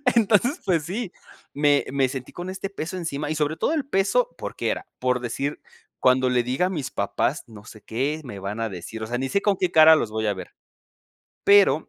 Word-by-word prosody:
entonces 230 - +3
pues 170 -5 +1
sí, 195 +3 -4 0.4
me 145 -1 +3
me 135 -1 +2
sentí 130 -1 -6
con 180 +1 -6
este 190 +1 -5
peso 185 -1 -5
encima 150 -4 -3
y - - -1
sobre 150 +1 0
todo - - 0
el 310 -3 0
peso, 275 - +1
¿por - - -6
qué - - -1
era? - - -3
Por 125 -1 +1
decir 135 +4 -3 0.4
cuando 130 0 +4
le 125 -1 +2
diga 130 +9 0
a - - -3
mis 150 -8 -4
papás, 120 +8 -1
no 110 -3 -13
sé 110 0 -12
qué 140 +9 -2
me 120 -6 -7
van 100 +3 -5
a 115 - 0
decir. 95 +4 -7
O 110 - -4
sea, 120 +2 -2
ni 135 +2 -2
sé 200 - +1
con 205 -1 +2
qué 180 -1 0
cara 160 -1 +8
los 115 -8 -1
voy 110 0 -1
a 105 - +2
ver. 95 -1 -9 0.9
Pero 200 -6 +5
145 Hz, 225 wpm, -24 LUFS, 125-185 Hz, 0.9 s, cara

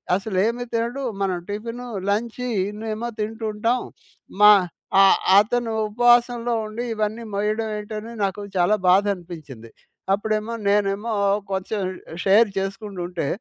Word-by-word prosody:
అసలేమి 215 +4 0
తినడు 235 +4 -1 0.2
మనం 185 -2 0
టిఫిను, 230 +4 -5 0.2
లంచి 235 +4 -1 0.2
ఇన్నేమో 220 +2 -4
తింటుంటాం. 220 +2 -1 0.6
మా 210 0 +10 0.5
ఆహ్, 195 - +6 0.2
అతను 225 +2 0
ఉపవాసంలో 240 +1 +3
ఉండి 215 +3 -5
ఇవన్నీ 215 +2 -2
మోయడం 215 +2 -1
ఏంటని 215 +2 -6
నాకు 195 +1 -1 0.2
చాలా 180 +4 +4
బాధనిపించింది. 175 - 0 0.4
అప్పుడేమో 215 +2 -1
నేనేమో 205 +2 +1 0.4
కొంచెం 195 +2 -2 0.4
షేర్ 205 +3 +5
చేసుకుంటుంటే 190 -4 -4
215 Hz, 105 wpm, -23 LUFS, 195-230 Hz, 0.6 s, మా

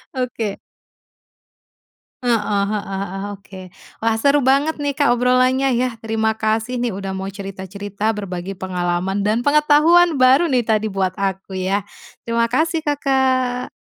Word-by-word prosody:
Oke. 240 -5 -3 1.6
Heeh 240 -2 +3 0.3
heeh 210 -1 -2
heeh, 195 0 -5
oke, 195 -1 -11 0.4
wah 225 - +3
seru 280 0 +3
banget 280 +4 +2
nih 290 -1 -2
Kak 285 -1 +1
obrolannya 255 +2 +2
ya, 245 -1 0
terima 220 0 0
kasih 220 +3 -1
nih 240 -3 -1
udah 195 0 -5
mau 190 - -4
cerita-cerita 200 +2 -4
berbagi 195 -2 -5
pengalaman 185 +1 -2
dan 215 +3 +1
pengetahuan 300 +2 +4
baru 260 +6 +6
nih 250 - +4
tadi 215 -1 +1
buat 190 -1 -1
aku 195 -1 -3
ya, 190 +2 0 0.5
terima 230 0 +2
kasih 315 +7 0
Kakak. 260 -3 0
225 Hz, 135 wpm, -20 LUFS, 195-260 Hz, 1.6 s, baru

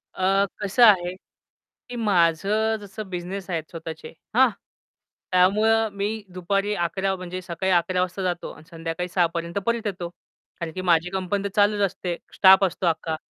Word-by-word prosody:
अ, 195 +1 +2 0.2
कसं 205 +4 +2
आहे, 180 -4 +4 0.8
की 245 - -6
माझं 205 +2 +2
जसं 205 0 -8
बिझनेस 185 +2 -5
आहेत 165 -3 -2
स्वतःचे. 160 -1 -8 0.2
हां, 260 +1 +6 0.8
त्यामुळं 215 +5 +3
मी 200 - 0 0.3
दुपारी 195 +3 -1
11:00 190 +2 -1
म्हणजे 185 0 -6
सकाळी 180 +2 -2
11:00 180 +1 +2
वाजता 185 +1 -2
जातो 175 -1 -2
आणि - - -14
संध्याकाळी 165 +1 -4
6:00 175 0 +2
पर्यंत 170 +2 -3
परत 235 -1 0
येतो. 180 -3 -4 0.5
कारण 170 -1 -4
की 185 - -4
माझी 175 -1 +2
कंपनी 195 +1 -2
तर 200 - -2
चालूच 205 0 +3
असते, 180 -1 -4 0.2
स्टाफ 190 0 +7
असतो 185 0 -3
अख्खा. 160 -1 -1
185 Hz, 160 wpm, -24 LUFS, 175-200 Hz, 0.8 s, स्टाफ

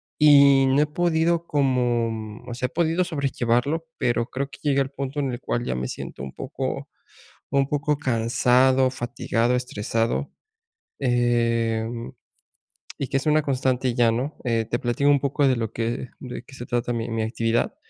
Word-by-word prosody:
y 140 -2 +6
no 135 +2 +3
he - - +1
podido 170 +1 +1
como, 125 -5 +1
mm, 110 +2 -8
o - - -4
sea, 125 +2 -2
he - - -15
podido 170 +2 +1
sobrellevarlo, 140 -1 -1
pero 120 -1 0
creo 135 +1 -3
que - - -12
llegué 140 -2 +2
al 135 0 -2
punto 140 +1 -4
en 135 - -1
el 120 - -5
cual 120 - -2
ya - - -1
me 65 0 -3
siento - - -7
un 65 0 -6
poco - - -4 0.6
un 140 -1 +2
poco 150 +1 0
cansado, 130 +1 +3
fatigado, 120 -1 -1
estresado, 115 +1 -1 0.7
eh, 120 -3 +1
mm, 115 -1 -6 0.9
y 135 - -3
que 135 - +1
es 135 - -3
una 155 0 +3
constante 130 -2 0
ya, 120 -2 +3
¿no?, 130 +7 -3
eh, 115 -2 0
te 120 - -1
platico 120 +4 0
un 140 - +4
poco 140 +1 +1
de 130 - +3
lo 115 -2 -3
que 115 +2 -3
de 125 -2 -7
qué 135 +2 -15
se 120 - -7
trata 120 0 -1
mi 115 0 -3
mi 115 -1 -1
actividad. 115 +1 0
125 Hz, 180 wpm, -24 LUFS, 115-140 Hz, 0.9 s, y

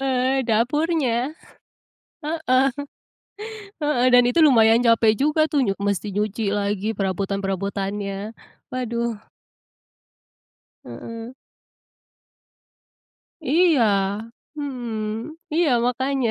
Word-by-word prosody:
Heeh, 265 0 +1
dapurnya. 260 +2 +1 0.9
Heeh. 295 -4 +2 1.2
Heeh, 275 -4 +2
dan 245 - +8
itu 245 - +1
lumayan 230 -5 +5
capek 230 -1 +5
juga 300 +3 +1
tuh 290 - +2
nyu 195 - 0
mesti 200 0 -1
nyuci 210 +2 -1
lagi 205 0 -1
perabotan-perabotannya. 195 +1 -3 0.4
Waduh. 235 -3 -3 1.6
Heeh. 230 - -8 2.1
Iya. 315 -1 +3 0.7
Hmm, 240 -3 -4 0.2
iya 330 -1 +3 0.2
makanya. 260 0 0
235 Hz, 75 wpm, -22 LUFS, 210-270 Hz, 2.1 s, dan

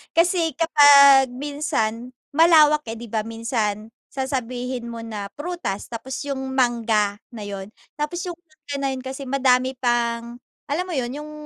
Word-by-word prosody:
Kasi 335 0 +2
kapag 280 -4 +6
minsan, 250 -4 -3 0.2
malawak 305 -2 +6
eh, 225 - -7
di 235 - -8
ba? 220 0 -2
Minsan 225 -2 -3 0.2
sasabihin 250 -2 -4
mo 230 - -7
na 215 -3 -6
prutas, 295 - -5
tapos 245 +3 -6
yung 265 -1 -4
mangga 230 -5 +1 0.2
na 215 -4 -8
yun. 200 0 -7 0.2
Tapos 300 +4 -3
yung 350 - -5
mangga 310 -4 -10
na - - +1
yun 260 - -4
kasi 265 +1 -6
madami 260 -1 +2
pang 235 -1 -1 0.3
alam 300 +5 -1
mo - - -4
yun? 255 -6 -2
Yung 305 0 -9
260 Hz, 150 wpm, -22 LUFS, 230-290 Hz, 0.3 s, kapag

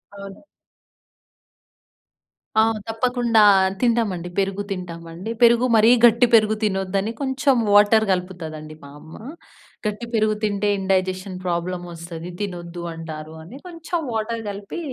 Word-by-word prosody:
అవును. 200 -1 -11 2.1
ఆ! - - +7 0.3
తప్పకుండా 235 -1 +1 0.4
తింటామండి, 220 -8 0
పెరుగు 195 +1 -1
తింటామండి. 175 +1 -6
పెరుగు 235 +1 +5
మరీ 220 +1 +5 0.2
గట్టి 235 +1 +5
పెరుగు 215 -1 +4
తినొద్దని, 195 +1 -1
కొంచెం 270 0 +1 0.2
వాటర్ 210 +2 +5
కలుపుతాదండి 160 -4 -5
మా 140 - -11
అమ్మ. 160 +2 -14 0.7
గట్టి 210 +2 -3
పెరుగు 215 -1 +2
తింటే 205 -1 0
ఇండైజెషన్ 190 0 -1
ప్రాబ్లమొస్తది 170 -1 -5
తినొద్దు 175 -3 -6
అంటారు 160 -1 -8
అని. 205 +11 -11
కొంచెం 345 0 -4
వాటర్ 225 +1 -2
కలిపి 200 - -7
200 Hz, 110 wpm, -22 LUFS, 175-225 Hz, 2.1 s, ఆ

